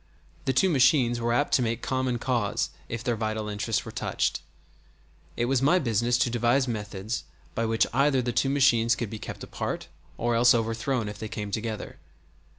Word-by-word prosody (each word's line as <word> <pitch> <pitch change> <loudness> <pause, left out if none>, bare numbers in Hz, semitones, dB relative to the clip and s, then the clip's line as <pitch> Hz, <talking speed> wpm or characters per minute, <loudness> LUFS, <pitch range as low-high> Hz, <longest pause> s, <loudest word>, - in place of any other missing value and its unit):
The 135 - +2
two 160 +9 +4
machines 130 -5 +3
were 120 0 0
apt 145 +5 +1
to - - +4
make 115 0 -1
common 130 -2 0
cause 120 -4 -1 0.2
if 115 0 -4
their 120 -3 0
vital 110 -1 -2
interests 105 +1 -1
were - - -7
touched. - - -1 1.0
It 120 - +1
was 130 0 +1
my 145 +7 +4
business 120 - +1
to 125 - +2
devise 120 +3 +2
methods 105 -1 -4 0.3
by 115 - -1
which 115 0 +2
either 135 +1 +3
the 120 - -1
two 120 +3 +2
machines 120 -4 +4
could 115 -3 -4
be 110 - -6
kept - - -7
apart - - -4 0.3
or 120 +1 0
else 120 +2 +5
overthrown 115 +1 -1
if 105 0 -7
they 110 - -5
came 105 -1 -5
together. 110 0 -4
120 Hz, 185 wpm, -27 LUFS, 110-130 Hz, 1.0 s, else